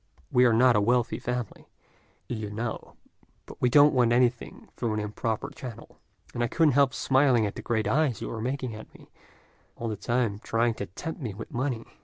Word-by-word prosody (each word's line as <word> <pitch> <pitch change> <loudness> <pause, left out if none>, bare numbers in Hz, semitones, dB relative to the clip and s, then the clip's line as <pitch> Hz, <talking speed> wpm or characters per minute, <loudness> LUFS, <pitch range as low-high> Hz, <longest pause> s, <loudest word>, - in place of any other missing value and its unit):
"We 125 0 +5
are 120 - +5
not 120 +2 +5
a 105 - +3
wealthy 120 +2 +1
family, 125 -3 -5 0.6
you 110 -3 -4
know, 110 +2 -5 0.5
but - - -13
we 125 - +3
don't 145 +4 +6
want 125 -3 +3
anything 120 0 0
through 115 -3 -2
an - - -1
improper 105 +1 -3
channel; 125 -4 -10 0.3
and 120 - -1
I - - +1
couldn't 160 +4 +3
help 140 0 +3
smiling 130 -4 +3
at 100 - -3
the - - -7
great 110 -2 -1
eyes 145 -7 +1
you - - -5
were 110 - -5
making 130 0 -3
at 110 0 -10
me, - - -17 0.6
all 115 - -4
the 110 - -2
time 115 0 -1
trying 115 +1 0
to 100 - -3
tempt 160 - -7
me 110 -7 -4
with 110 - -9
money. 125 -2 -2
120 Hz, 200 wpm, -27 LUFS, 110-125 Hz, 0.6 s, don't